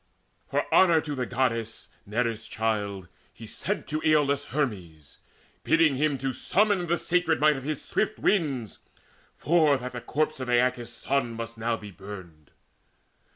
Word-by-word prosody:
For - - 0
honour 170 -4 +6
to 150 -2 -5
the 125 -3 -2
Goddess, 115 -3 -2 0.2
Nereus' 115 +1 -1
child, 105 -4 -2 0.2
He - - -12
sent - - -3
to 155 +1 -2
Aeolus 145 -2 +3
Hermes, 95 - -4 0.4
bidding 160 -3 +4
him 145 +1 +1
Summon 180 - +1
the 170 +1 +1
sacred 170 -2 +1
might 150 0 +4
of 135 - -5
his 150 +2 -4
swift 215 0 -1
winds, 140 - 0 0.6
For 155 -3 +3
that 125 0 -6
the 120 - -6
corpse 155 +2 -1
of 130 -1 -4
Aeacus' 120 -1 +1
son 120 0 -1
must 115 0 -6
now 115 +1 0
Be 105 -2 -10
burned. 95 -6 -11
130 Hz, 150 wpm, -27 LUFS, 115-155 Hz, 0.6 s, honour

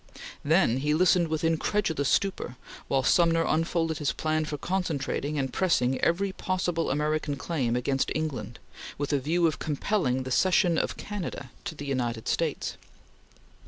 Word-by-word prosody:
Then 150 -5 +3
he 150 +3 +1
listened 180 0 +4
with 160 0 -2
incredulous 165 -2 +1
stupor 190 -10 0 0.3
while 135 -1 +1
Sumner 165 +3 +4
unfolded 165 0 0
his 150 - 0
plan 155 0 0
for 150 -1 -4
concentrating 155 -4 -2
and 135 -2 -2
pressing 135 -9 +1
every 190 +4 +1
possible 180 -3 -1
American 150 +1 0
claim 135 -5 -1
against 135 +2 0
England, 145 -7 -3 0.4
with 145 +1 -2
a 140 - +3
view 165 +6 +1
of 160 - +1
compelling 145 -4 0
the 130 - -6
cession 180 +2 +3
of - - -2
Canada 180 -10 -5
to - - -4
the 145 - -7
United 120 -5 -2
States. 160 -3 -1
155 Hz, 150 wpm, -27 LUFS, 140-170 Hz, 0.4 s, listened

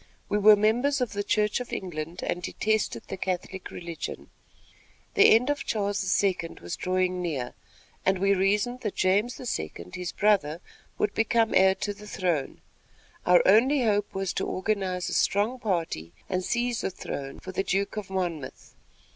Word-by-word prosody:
We 210 - +1
were 210 +1 +8
members 240 +7 +2
of 250 -4 -1
the 205 0 -2
Church 210 +1 +1
of 250 - -7
England 165 -2 -5
and 175 - -2
detested 215 +4 -1
the 195 - -5
Catholic 185 0 -4
Religion. 170 -2 -7 0.8
The 410 - +7
end 250 +5 +3
of 290 - -2
Charles 200 -2 0
II. 190 -2 +2 0.2
was 85 0 -5
drawing 185 0 0
near, 140 -8 -3 0.5
and 190 0 +2
we 195 +2 +3
reasoned 210 +6 +1
that 210 - -3
James 205 +6 +1
II., 85 - -4
his 180 -1 -4
brother, 190 -7 +2 0.4
would 210 - 0
become 225 0 +2
heir 190 0 +5
to 205 - -3
the 210 +1 -13
throne. 175 -8 -2 0.7
Our 180 0 +6
only 250 +7 +5
hope 205 -2 +1
was 195 -1 -1
to - - -2
organize 185 -2 -1
a - - -3
strong 215 +6 +1
party 165 - -2
and 185 -1 -1
seize 240 +3 0
the - - -1
throne 140 -6 -6
for 185 - -8
the 190 - -1
Duke 195 +2 -1
of 210 -3 -5
Monmouth. 175 -7 -4
195 Hz, 165 wpm, -27 LUFS, 180-215 Hz, 0.8 s, were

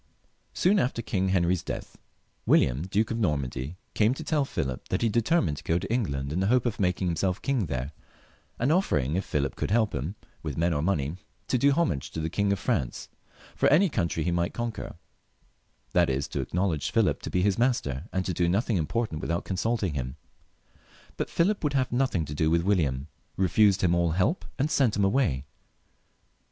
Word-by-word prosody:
Soon 195 +3 +3
after 120 -1 -1
King 95 -3 0
Henry's 90 -1 +2
death, - - -6 0.5
William, 65 +8 +3
Duke 105 +4 0
of 115 - -2
Normandy, 70 - -2 0.2
came 110 +4 +3
to 160 - -6
tell 150 -2 +1
Philip 65 - -4
that - - -1
he - - +4
had 115 - +2
determined 120 - +2
to - - -9
go 85 - +1
to 95 +2 -3
En^and 70 - -1
in 90 +5 -1
hopes 120 +6 +3
of 120 -1 -2
making 90 -1 +1
himself 90 +2 0
king 130 -9 0
there, 65 0 -3 0.7
and 125 +5 +1
offering 75 - +1
if 95 - 0
Philip 70 -6 -2
would - - 0
help 110 0 +2
him 80 +11 -3 0.3
with 75 -4 -5
men 85 +1 +2
or 75 - 0
money, 80 -2 0 0.3
to 130 - +2
do 140 +3 +4
homage 85 - 0
to - - -3
the 80 0 -2
King 100 +1 +1
of 100 - +1
France 65 -8 -2 0.5
for - - +3
any 175 +7 +5
country 85 - -1
he 85 - 0
might 85 0 -1
conquer, 120 -2 -4 1.0
that - - +4
is 65 +1 -1
to - - -2
acknowledge 90 -4 -1
Philip - - +1
to - - -5
be 90 - +1
his 100 +1 +2
master, 120 - 0
and 95 -1 -1
to 90 - -1
do 85 0 +1
nothing 105 +3 +1
im 80 -3 -1
portant 110 -10 -2
without 85 +1 -2
consulting 100 -2 -1
him. 65 -1 -4 1.0
But - - -3
Philip 195 +4 +1
would 145 -2 0
have 130 -2 +1
nothing 120 -10 +1
to 75 - -6
do 80 +1 +1
with 85 +1 +2
William, 75 -8 +1 0.3
refused 100 +1 +4
him 90 -2 +3
all 85 -2 +2
help, 95 - +1
and 145 +3 0
sent 130 -8 +3
him 100 -1 +2
away. 95 - +1
95 Hz, 200 wpm, -27 LUFS, 80-115 Hz, 1.0 s, any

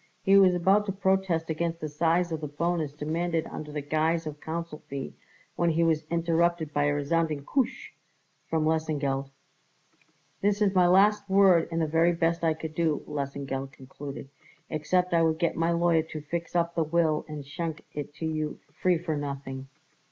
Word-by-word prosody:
He 195 - +5
was 190 -2 +6
about 195 +4 +3
to - - 0
protest 190 -4 0
against 165 +1 -2
the 155 - -3
size 165 +3 +1
of 160 -1 -3
the 150 - -3
bonus 160 +1 -1
demanded 160 +3 -2
under 150 -1 -7
the 150 -1 -4
guise 160 +3 0
of 150 -1 -7
counsel 165 -1 -5
fee 135 -1 -5 0.4
when 170 - +2
he 165 +1 +2
was 160 -2 +1
interrupted 170 -1 +1
by 145 0 +2
a 145 - +2
resounding, 150 0 0
"Koosh!" 265 - -1 0.6
from 160 -1 +1
Lesengeld. 145 -4 0 1.1
"That 205 +1 +2
is 205 -2 +2
my 180 -2 +5
last 200 +2 +4
word 190 -4 +5
and 165 - -1
the 160 - +2
very 165 +3 +3
best 165 0 0
I 160 -1 +2
could 160 0 -6
do," 160 -2 0
Lesengeld 135 -2 -4
concluded, 135 +1 -9 0.4
"except 180 +4 +1
I 165 - +4
would 160 -1 +2
get 170 0 0
my 165 +1 +1
lawyer 170 -1 +3
to 160 -1 -7
fix 170 +3 -5
up 170 0 +1
the 165 - +1
will 155 -1 +1
and 150 -2 -7
schenk 160 +2 -5
it 145 -1 -5
to 160 - -5
you 155 -1 -2 0.2
free 180 +3 +2
for 160 -1 -3
nothing." 140 -2 -5
160 Hz, 180 wpm, -28 LUFS, 150-170 Hz, 1.1 s, was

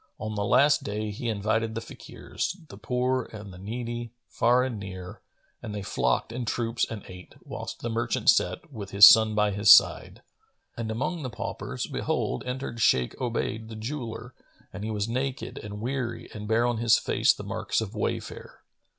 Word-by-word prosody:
On 110 +1 -5
the 105 -1 -2
last 145 +8 +4
day 105 +1 -3
he 115 +3 -4
invited 110 +1 -1
the - - -1
Fakirs, 170 +8 -6
the - - -10
poor 125 0 -1
and 105 -3 -9
the 90 - -11
needy, 120 +3 -5
far 125 +2 +3
and 125 -5 -3
near, 95 -2 -8 0.4
and 105 - -6
they 100 - -4
flocked 65 - 0
in 125 +2 -4
troops 115 0 -1
and 110 -3 -6
ate, 90 0 -12
whilst - - -7
the 120 - -2
merchant 115 +1 -2
sat, - - -1
with 100 -4 -7
his 100 +1 +10
son 110 -1 +6
by 105 -1 +2
his 100 +1 +5
side.[FN#448] - - +5 0.6
And 115 -1 -3
among 135 +10 -2
the 130 - -4
paupers, 120 - -5
behold, 65 - -2
entered 125 -2 -4
Shaykh 65 -10 +3
Obayd 115 -2 -2
the 110 - -8
jeweller 115 0 -6 0.4
and 100 - -6
he 110 - -3
was 105 -1 -1
naked 130 +3 -3
and 105 -1 -7
weary 120 0 -3
and 105 -1 -7
bare 115 +2 +2
on 120 -1 0
his 115 0 +4
face - - +3
the - - -5
marks - - -2
of - - -4
wayfare. - - -5
110 Hz, 185 wpm, -27 LUFS, 105-120 Hz, 0.6 s, his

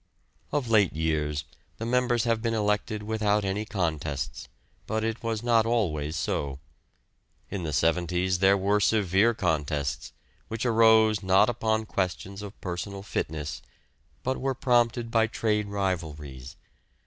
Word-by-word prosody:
Of 145 -4 -1
late 105 -5 +4
years 75 -2 -1 0.3
the 115 - -4
members 120 -1 +2
have 115 -2 +1
been 115 0 0
elected 105 0 0
without 105 -1 +1
any 100 +3 -1
contests, 75 -8 -3 0.4
but 110 +1 -1
it 115 0 -2
was 115 -1 -2
not 115 -2 +4
always 80 -10 0
so. 70 -4 -2 0.9
In 100 - -3
the 80 -2 -3
'seventies 90 +4 +1
there 95 +1 +5
were 100 +2 +2
severe 105 +2 +3
contests, 75 -7 -1 0.4
which 115 +2 -4
arose 110 -2 +5
not 95 +3 +4
upon 110 -2 0
questions 95 0 -3
of 105 0 -9
personal 95 +2 -5
fitness, 75 -6 -4 0.6
but 130 +1 -2
were 135 0 0
prompted 120 -2 +1
by 115 -1 +3
trade 105 -2 0
rivalries. 75 -10 -4
100 Hz, 135 wpm, -27 LUFS, 85-115 Hz, 0.9 s, there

